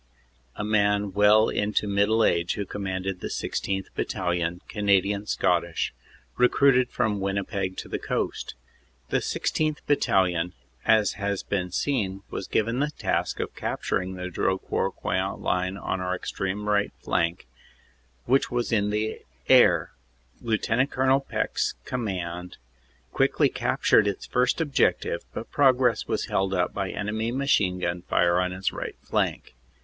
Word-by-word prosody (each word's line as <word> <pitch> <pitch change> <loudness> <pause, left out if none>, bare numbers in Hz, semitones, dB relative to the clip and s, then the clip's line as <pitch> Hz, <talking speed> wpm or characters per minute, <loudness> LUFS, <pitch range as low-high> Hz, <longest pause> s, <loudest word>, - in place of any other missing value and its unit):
a - - -4
man 105 -1 +1
well 105 +2 +5
into 105 0 0
middle 100 +3 +3
age 85 0 +1
who 100 - -3
commanded 95 -1 -4
the - - -4
16th. 95 -1 -2
Battalion, 90 -1 -1
Canadian 100 0 +1
Scottish, 85 -4 0 0.4
recruited 125 0 +4
from 110 -4 0
Winnipeg 100 -1 -2
to - - -6
the - - -3
Coast. - - -3 0.5
The - - +2
16th. 155 -1 -1
Battalion, 90 - +2 0.3
as 110 -2 +4
has 100 -1 -1
been 90 -3 -2
seen, 100 -5 -1
was - - -4
given 115 +3 0
the 145 +1 +1
task 150 - -2
of - - -3
cap - - -4
turing 95 0 -1
the 90 0 -5
Drocourt 95 +2 -1
Queant - - -2
line 90 +1 -1
on 95 -1 -3
our 90 0 -1
extreme 95 +2 -4
right 105 -1 +2
flank, 85 +2 0 0.8
which 135 +2 +2
was 120 -1 -1
in 105 -2 +2
the 105 +1 -2 0.3
air. - - +5 0.5
Lt. 115 +3 +1
Col. 130 +1 +3
Peck 135 - -2
s - - +1
command 90 -7 -4 0.6
quickly - - +3
cap - - -2
tured 105 - +5
its 100 - -3
first 125 +4 +1
objective 150 -4 +1
but - - -7
progress 130 -4 +3
was - - -1
held 95 0 0
up 90 -1 0
by 95 -2 -2
enemy 110 +4 -2
machine 120 -9 +2
gun 85 -1 -2
fire 90 0 +2
on 90 0 +1
his 95 +1 -2
right - - -5
flank. - - -1
100 Hz, 145 wpm, -26 LUFS, 90-110 Hz, 0.8 s, well